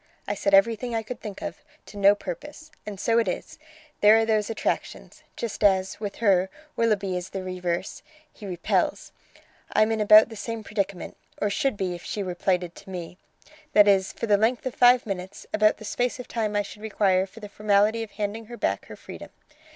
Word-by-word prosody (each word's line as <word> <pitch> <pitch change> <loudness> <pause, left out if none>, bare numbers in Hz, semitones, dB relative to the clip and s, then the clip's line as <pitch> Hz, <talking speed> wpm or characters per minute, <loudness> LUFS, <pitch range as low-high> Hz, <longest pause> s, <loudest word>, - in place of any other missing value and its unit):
I 205 - 0
said 200 -1 +2
everything 230 +4 +2
I 225 - -1
could 230 +2 -7
think 205 -3 -7
of, - - -5 0.3
to - - -14
no 200 0 +5
purpose. 295 - -8 0.2
And 200 -2 -6
so 230 +3 +2
it 225 - 0
is: 180 - -5 0.4
there 210 +2 +7
are 225 - +2
those 215 -1 +1
attractions! 225 - -3 0.2
just 230 -2 -4
as, 190 -2 +2
with 205 -2 -5
her, 190 -4 +2 0.3
Willoughby 205 -5 +1
is 180 0 -4
the 190 -1 -5
reverse, 180 -1 -3 0.3
he 210 - -10
repels. 175 -2 -1 0.6
I'm 215 +1 +3
in 220 -1 0
about 215 +2 +7
the 225 - -9
same 225 +1 -5
predicament 200 -3 -4 0.2
or 205 - 0
should 270 -1 0
be 185 -2 -2
if 175 - -9
she 205 - -3
were 185 -1 -4
plighted 180 -1 -1
to - - -13
me. 180 0 -7 0.5
That 210 0 +7
is, 195 -1 +3
for - - -4
the 205 -2 +4
length 230 +5 +1
of 260 - -2
five 245 0 +5
minutes; 190 -2 -6
about 215 0 +3
the 215 - -10
space 245 +4 -1
of 250 - -7
time 215 -3 -2
I 205 - +2
should 210 +1 -11
require 195 -3 +1
for 205 +4 -14
the 210 - -8
formality 210 +2 +2
of 225 - -5
handing 210 +2 -4
her 240 0 -9
back - - -1
her - - -9
freedom. - - -10
205 Hz, 205 wpm, -25 LUFS, 190-225 Hz, 0.6 s, there